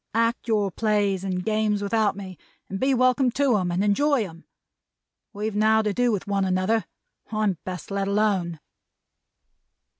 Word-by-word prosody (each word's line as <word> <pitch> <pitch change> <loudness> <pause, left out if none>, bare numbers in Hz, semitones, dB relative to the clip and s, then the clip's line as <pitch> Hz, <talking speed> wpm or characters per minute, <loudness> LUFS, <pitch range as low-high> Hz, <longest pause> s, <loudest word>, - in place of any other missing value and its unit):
Act 230 +1 +1
your 210 -3 +1
Plays 205 -2 0
and 185 -2 -3
Games 215 -1 0
without 215 0 +1
me, 190 -2 -7 0.4
and 195 - -3
be 265 +1 +2
welcome 255 0 +3
to 275 -4 +2
'em 180 -3 -1
and 180 +3 0
enjoy 240 +2 +2
'em. 165 -1 -14 0.9
We've 210 0 -4
now 220 +1 +3
to 210 -1 0
do 245 +2 +2
with 205 -4 -2
one 200 -1 0
another. 190 +4 +1 0.5
I'm 210 -5 0
best 185 0 -6
let 195 0 -1
alone!'" 200 -5 0
210 Hz, 155 wpm, -24 LUFS, 195-220 Hz, 0.9 s, welcome